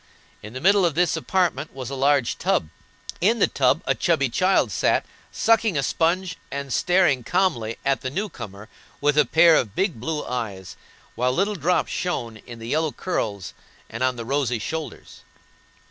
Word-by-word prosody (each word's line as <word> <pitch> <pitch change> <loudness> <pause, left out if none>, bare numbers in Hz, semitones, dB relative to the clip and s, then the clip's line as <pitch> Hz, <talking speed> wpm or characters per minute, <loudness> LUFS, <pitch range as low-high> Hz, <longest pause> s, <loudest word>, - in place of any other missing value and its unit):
In 105 +2 -10
the 130 - -6
middle 200 +3 +4
of 170 -4 +1
this 175 0 +2
apartment 160 -5 -1
was 130 -1 -6
a - - -3
large 135 -2 +1
tub; 75 - 0 0.5
in 220 +6 +3
the - - +4
tub - - +1
a - - +2
chubby - - +1
child - - +2
sat, - - +1 0.3
sucking 225 -6 +2
a 140 - +1
sponge 170 +3 0
and 140 -2 -4
staring 175 -8 +2
calmly 120 - 0
at 135 -1 +1
the 130 - -3
new 195 +10 -2
comer 100 - -10 0.3
with 145 0 +2
a 150 -1 +5
pair 165 0 +6
of 105 -9 0
big 185 - 0
blue 150 +5 -3
eyes, 100 -8 -5 0.4
while 125 +1 0
little 195 +9 0
drops 175 -1 0
shone 120 -11 -3
in 120 +2 -11
the 115 0 -8
yellow 155 +2 +1
curls 105 - -3 0.4
and 115 - -6
on 130 0 +1
the 115 -1 -6
rosy 135 -2 0
shoulders. 160 +8 -6
145 Hz, 175 wpm, -23 LUFS, 120-175 Hz, 0.5 s, pair